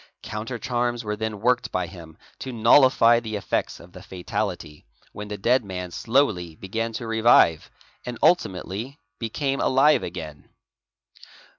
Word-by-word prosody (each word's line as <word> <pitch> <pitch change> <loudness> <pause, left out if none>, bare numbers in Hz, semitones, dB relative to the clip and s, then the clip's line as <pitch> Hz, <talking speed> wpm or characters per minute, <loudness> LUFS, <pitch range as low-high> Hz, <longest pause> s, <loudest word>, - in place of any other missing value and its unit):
_Counter 115 +3 -5
charms 120 -1 -2
were 105 -1 -3
then 110 -1 -4
worked 125 +1 +1
by 90 -1 -1
him 85 -3 -12 0.2
to 130 - -6
nullify 120 0 +5
the 110 -2 -6
effects 100 - -2
of - - -15
the - - -12
fatality, 85 -4 -5 0.3
when 105 0 -8
the 105 0 -6
dead 120 +6 +2
man 90 -2 -6
slowly 105 - 0
begat 115 +6 -4
to 120 - -5
revive, 110 -8 +3 0.3
and 125 -1 -6
ultimately 115 - 0 0.2
became 135 +4 -2
alive 140 +3 +4
again. 80 -5 -8
110 Hz, 140 wpm, -24 LUFS, 95-120 Hz, 0.3 s, nullify